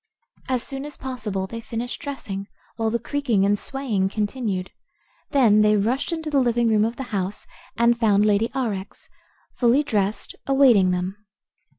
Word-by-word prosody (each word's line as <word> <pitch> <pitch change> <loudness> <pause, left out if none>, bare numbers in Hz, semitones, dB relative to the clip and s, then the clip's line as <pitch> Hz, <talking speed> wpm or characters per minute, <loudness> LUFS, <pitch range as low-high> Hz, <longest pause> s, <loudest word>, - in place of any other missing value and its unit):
As 255 -2 0
soon 270 -1 -5
as 295 0 -8
possible 215 -7 -4
they 230 +4 -7
finished 235 +2 -5
dressing, 200 -9 -5 0.3
while 225 -1 0
the 235 - 0
creaking 235 -5 0
and 205 +1 +3
swaying 230 -9 -1
continued. 205 -3 -2 0.6
Then 230 -7 +5
they 210 0 +4
rushed 240 - 0
into 320 -2 -3
the 280 - +3
living 240 -2 +2
room 215 -1 +3
of 230 +2 -2
the 265 - -5
house 195 0 -2 0.3
and 235 0 +3
found 210 -3 +4
Lady 210 +2 +2
Aurex, 210 -7 -4 0.5
fully 245 +4 +4
dressed, 210 -6 -1
awaiting 260 -9 +5
them. 180 +2 -2
230 Hz, 160 wpm, -23 LUFS, 205-260 Hz, 0.6 s, Then